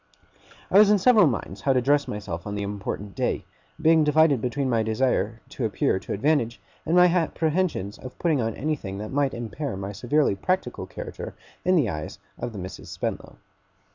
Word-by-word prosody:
I 195 - +7
was 210 -1 +7
in 210 - +6
several 215 -2 +6
minds 100 -6 -3
how 135 - +3
to 130 - +2
dress 145 +3 +2
myself 100 -4 -5
on 105 - -4
the 100 - -2
important 100 0 -5
day; - - -1 0.3
being 160 0 +5
divided 150 -3 +4
between 130 +3 -1
my 115 -3 +2
desire 110 -1 0
to - - -5
appear 95 - +1
to - - -9
advantage, 120 0 +1 0.3
and 165 - +2
my 180 0 +8
apprehensions 165 - 0
of 130 - -10
putting 160 -6 +1
on 115 -1 -2
anything 135 -10 -3
that 105 +1 -6
might 140 -1 +1
impair 120 +1 -4
my 95 +1 -4
severely 125 +6 +1
practical 185 - -2
character - - -7 0.3
in 185 +1 +3
the 150 -9 +3
eyes 75 -4 -5 0.2
of - - -3
the 105 - -9
Misses 90 -1 -8
Spenlow. - - -4
130 Hz, 185 wpm, -25 LUFS, 105-155 Hz, 0.3 s, my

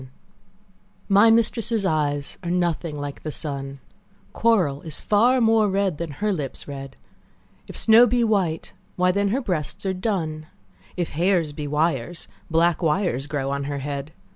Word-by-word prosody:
CXXX 130 - -11 1.0
My 205 +3 +6
mistress' 230 -1 +2
eyes 145 -4 -1
are 175 - -5
nothing 170 -3 -1
like 145 -1 -6
the 155 - -5
sun; 140 -2 -5 0.5
Coral 180 -12 +2
is 155 -3 -4
far 240 +5 +3
more 225 -2 +4
red, 190 -5 0
than 170 -1 -3
her 210 +8 -1
lips 145 -7 -5
red: 135 -1 -7 0.7
If - - -9
snow 230 +2 +6
be 245 +1 +2
white, 195 -8 0 0.2
why 180 0 +3
then 200 +2 +1
her 240 +8 0
breasts 175 - -3
are 190 - 0
dun; 170 -6 -3 0.5
If 175 -3 -1
hairs 170 -2 +1
be 145 0 -5
wires, 155 +1 -1 0.2
black 165 +1 +2
wires 155 -5 0
grow 140 -2 -2
on 140 0 -2
her 145 0 -3
head. 140 +1 -5
170 Hz, 160 wpm, -23 LUFS, 145-200 Hz, 1.0 s, My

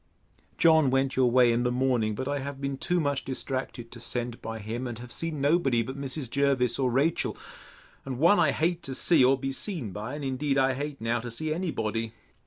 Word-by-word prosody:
John 160 -4 +5
went 135 +1 +1
your 130 -1 +4
way 125 -1 +5
in 120 - +1
the 125 0 +1
morning; 125 -4 +1
but 130 +4 -4
I 145 0 -1
have 140 0 -6
been 140 0 -2
too 175 +6 0
much 145 -3 -1
distracted 130 -2 -4
to 120 - -10
send 120 0 -3
by 115 0 -5
him; 115 +4 -4
and 120 -2 -5
have 120 +1 -10
seen 165 0 -3
nobody 140 -5 +2
but 130 +4 -6
Mrs. 140 0 -3
Jervis 135 -1 +1
or 130 -2 +2
Rachel, 140 +7 +1 0.7
and 130 -2 -5
one 170 +9 +5
I - - +4
hate 170 +2 0
to 135 - -5
see 165 -2 +4
or 135 +2 +5
be 135 +1 -3
seen 140 - -3
by 105 +8 -5
and 145 -1 -5
indeed 135 +1 -1
I 135 -1 +3
hate 140 0 -5
now 115 +1 0
to 120 +1 -6
see 155 +7 -2
any 180 +2 -2
body. 115 -3 -2
135 Hz, 220 wpm, -27 LUFS, 120-145 Hz, 0.7 s, John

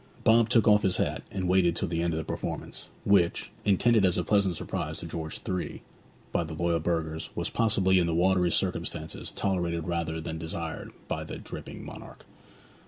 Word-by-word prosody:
Bob 115 0 +5
took 115 -3 +4
off 105 -1 +6
his 95 -2 +2
hat - - 0
and 95 -2 -2
waited 90 -2 +3
till 100 - 0
the 85 0 -1
end 85 0 +1
of 80 - -2
the 80 - -2
performance, - - -5
which, 100 -4 +2
intended 110 +2 +4
as 90 -2 +4
a 90 - +1
pleasant 100 -2 +2
surprise - - -3
to - - -6
George 80 -1 -4
III. 90 -1 -3 0.5
by 85 - +1
the 80 -1 -6
loyal 85 +1 +1
burghers, 80 -1 -2
was - - -2
possibly 95 -4 +3
in 85 - +2
the 85 - 0
watery 90 0 +3
circumstances - - -2
tolerated 85 -4 -1
rather 85 -2 -1
than 80 0 -5
desired 80 0 -5 0.2
by - - -2
that - - -8
dripping - - -8
monarch. - - -10
85 Hz, 185 wpm, -28 LUFS, 85-95 Hz, 0.5 s, off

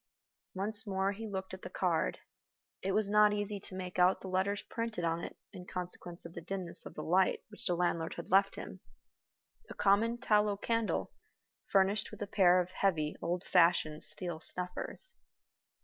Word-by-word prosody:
Once 210 +3 -2
more 190 0 +1
he 220 +2 -6
looked 190 -2 -5
at 190 - -7
the - - -7
card. - - 0 0.6
It 190 0 -1
was 215 0 +2
not 210 0 +5
easy 205 0 -2
to 185 - -6
make 185 -1 -5
out 180 +1 +5
the 190 - -6
letters 190 +2 0
printed 230 -6 -4
on 165 0 0
it - - -7 0.2
in 180 -2 -9
consequence 175 -1 -6
of 170 - -9
the 170 - -7
dimness 185 0 -2
of - - -12
the - - -5
light 185 +3 +2
which 210 - -4
the 175 - +2
landlord 170 -2 0
had - - -8
left 195 +1 +4
him - - -8 0.9
a - - -8
common 215 +4 +3
tallow 210 -3 +2
candle, 230 +1 -1 0.6
furnished 195 +2 +2
with - - -6
a - - -2
pair 185 -3 +5
of 180 0 -2
heavy 165 -6 0
old 175 +2 -1
fashioned 165 -4 +3
steel 165 +1 -3
snuffers. 180 - -1
190 Hz, 180 wpm, -33 LUFS, 180-205 Hz, 0.9 s, not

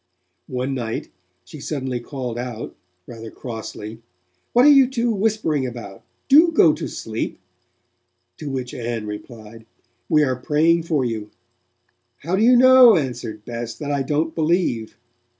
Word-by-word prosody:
One 130 +2 -3
night, 115 -4 -4 0.4
she 155 - -11
suddenly 130 -4 -3
called 125 -2 -6
out, 120 -2 -6 0.3
rather 115 -2 -9
crossly, 110 -2 -8 0.5
'What 245 +2 +5
are 295 - +8
you 275 -2 +6
two 240 -3 0
whispering 200 -10 0
about? 120 -5 -9 0.3
Do 315 +5 +6
go 170 - +5
to - - -5
sleep,' 110 0 -5 1.0
to 150 - -6
which 130 -2 -4
Ann 115 -2 -4
replied: 110 +1 -10 0.4
'We 155 -1 +4
are 130 -3 0
praying 160 +5 +2
for 145 -6 +1
you.' 110 -3 -4 0.9
'How 170 +5 -1
do 195 - 0
you 245 +3 +6
know,' 255 -3 +8
answered 120 -7 -4
Bess, 115 -1 -5
'that 145 -1 -5
I 140 -1 0
don't 150 +4 -1
believe?' 155 -10 -1
135 Hz, 145 wpm, -21 LUFS, 115-170 Hz, 1.0 s, are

